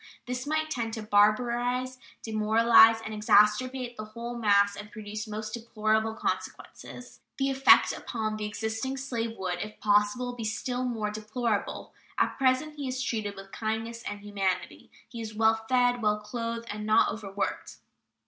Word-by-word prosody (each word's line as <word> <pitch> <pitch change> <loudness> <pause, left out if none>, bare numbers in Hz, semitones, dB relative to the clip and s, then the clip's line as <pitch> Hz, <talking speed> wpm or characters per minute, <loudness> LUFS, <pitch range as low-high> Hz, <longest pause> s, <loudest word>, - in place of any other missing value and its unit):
This 250 +2 -4
might 310 +1 -1
tend 230 -5 -2
to 220 - -6
barbarize, 240 +5 +2 0.2
demoralize, 225 +1 +5
and 220 - -5
exasperate 235 +4 +3
the 215 - -5
whole 235 +2 -7
mass 200 -3 +3
and 205 +1 -9
produce 210 +1 -6
most 215 0 -5
deplorable 220 -1 0
consequences. 245 +2 -6 0.2
The 270 0 +1
effect 270 0 +6
upon 220 -2 -3
the 210 -1 -3
existing 220 +5 -3
slave 235 -4 -3
would, 180 -2 -3
if 210 +3 -7
possible, 210 +4 +2
be 240 -2 -6
still 245 +3 -2
more 220 -4 -2
deplorable. 215 +1 -3 0.2
At - - +3
present 270 +3 +1
he 280 -2 -4
is 255 0 -3
treated 215 -4 -2
with 195 0 -11
kindness 225 +1 -3
and 205 -2 -6
humanity. 195 -3 -3 0.2
He 230 - -8
is 215 -1 -7
well 220 0 +2
fed, 245 -1 +3
well 210 -1 +1
clothed, 230 +2 -4
and 210 +1 -5
not 215 +1 +4
overworked. 200 -2 -4
220 Hz, 155 wpm, -28 LUFS, 210-245 Hz, 0.2 s, effect